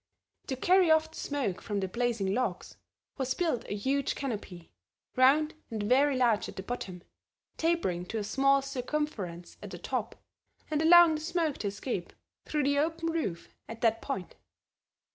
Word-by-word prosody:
To 265 - -2
carry 360 +6 +4
off 315 0 +4
the - - -12
smoke 275 -11 -2
from 205 -2 -2
the 190 - -1
blazing 230 -2 -1
logs, 225 -7 -2 0.4
was 260 -1 0
built 320 -10 -1
a - - -2
huge 270 +6 0
canopy, 205 - -6 0.4
round 285 +5 +4 0.2
and 220 -3 -3
very 265 +5 +3
large 235 -4 +2
at - - -10
the 190 - -6
bottom, 190 -6 -6 0.5
tapering 190 - 0
to 225 - -4
a 210 - -1
small 275 +5 +3
circumference 250 - -4
at - - -8
the - - -7
top, - - -3 0.6
and 305 0 +1
allowing 340 0 +8
the 305 - -3
smoke 325 -2 -1
to 205 - -2
escape 200 -2 -4 0.3
through 300 -1 0
the 285 +1 +2
open 330 +2 0
roof 245 - -3 0.2
at 225 0 -8
that 225 -1 +2
point. 185 -2 -4
255 Hz, 165 wpm, -30 LUFS, 205-305 Hz, 0.6 s, allowing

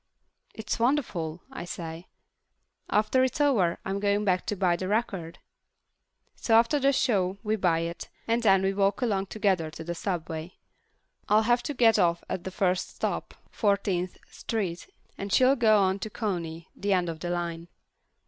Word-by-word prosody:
"It's 220 +1 -3
wonderful," 205 - 0
I - - -6
say. 170 0 -7 0.8
"After 215 +5 +3
it's 260 +2 -1
over, 225 -13 +3
I'm 195 +1 -2
going 205 +1 +1
back 185 -2 +1
to 210 - -1
buy 180 -3 +2
the 185 +2 -4
record." 195 -6 -2 1.0
So 225 - +1
after 235 +6 +4
the 275 0 +4
show 200 -8 +1
we 215 +1 +1
buy 175 -5 +1
it, 170 +1 -5 0.2
and 230 +1 +1
then 195 -4 +4
we 195 0 +1
walk 200 +4 +1
along 200 -4 0
together 190 -6 0
to 155 +1 -9
the 170 +1 -4
subway. 170 -1 -4 0.7
I'll 215 +1 +5
have 240 +2 +3
to 290 - -4
get 230 -3 +5
off 170 -1 +2
at 175 - -4
the - - -2
first 185 -1 -1
stop, - - -3 0.2
Fourteenth 195 -4 0
Street, 195 -7 -4 0.3
and 200 0 -4
she'll 260 +5 +5
go 220 -4 +4
on 190 -1 +2
to 215 - -5
Coney, 170 -7 -4
the 200 0 0
end 180 -2 +1
of 165 -1 -5
the 175 - -4
line. 170 -1 -3
195 Hz, 170 wpm, -27 LUFS, 175-220 Hz, 1.0 s, I'll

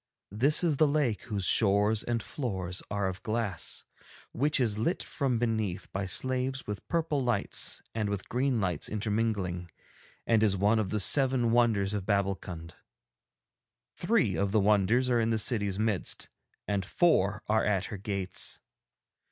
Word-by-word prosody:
This 135 - +3
is 160 -5 +2
the 155 - +5
lake 140 -7 0
whose 100 -5 -1
shores 105 +2 +3
and 115 -2 -2
floors 95 - -4
are 100 -1 -1
of 95 0 -5
glass, 110 -4 -3 0.5
which 145 +4 +1
is 110 -5 +1
lit 165 +11 0
from 135 -4 -1
beneath 110 -5 -2
by 95 0 -3
slaves 130 +5 -1
with 105 -1 -6
purple 160 -5 0
lights 120 -5 -1
and 110 -2 -1
with 100 -2 -4
green 125 0 0
lights 90 -6 -1
intermingling, 105 -5 -2 0.6
and 115 -2 +3
is 100 -3 +3
one 105 +4 +3
of 105 -3 -1
the 105 - -1
seven 130 +1 +3
wonders 110 -4 +2
of 100 -3 -3
Babbulkund. 95 -5 -2 1.2
Three - - +1
of 100 0 0
the 110 - +3
wonders 105 +5 +3
are 120 -2 +2
in 115 0 +1
the 115 - +1
city's 105 -3 +1
midst 110 -3 -1 0.4
and 100 -2 0
four 105 - +2
are 110 +1 +2
at 100 -3 +1
her - - -4
gates. 100 -2 -2
105 Hz, 155 wpm, -29 LUFS, 100-120 Hz, 1.2 s, the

